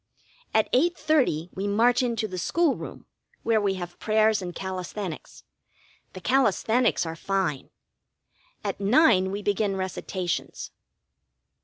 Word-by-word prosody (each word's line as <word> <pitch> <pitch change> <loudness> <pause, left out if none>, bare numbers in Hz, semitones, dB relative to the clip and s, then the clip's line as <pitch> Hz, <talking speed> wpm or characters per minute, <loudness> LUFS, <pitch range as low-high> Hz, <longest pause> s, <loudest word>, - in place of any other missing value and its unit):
At 220 - +1
8.30 270 - +2
we 195 +2 -3
march 235 +5 +3
into 230 -3 -1
the 185 -2 -5
school 335 - +2
room, - - -9 0.4
where 225 -2 +2
we 195 -2 +1
have 175 -1 -7
prayers 215 -1 +2
and 175 -2 -6
calisthenics. 185 -1 -6 0.7
The 185 - -9
calisthenics 245 -3 +2
are 165 0 -4
fine. 180 -6 -2 0.9
At - - -3
nine 200 - +4
we 200 +2 -4
begin 205 0 0
recitations. 185 -1 -4
200 Hz, 120 wpm, -26 LUFS, 185-230 Hz, 0.9 s, nine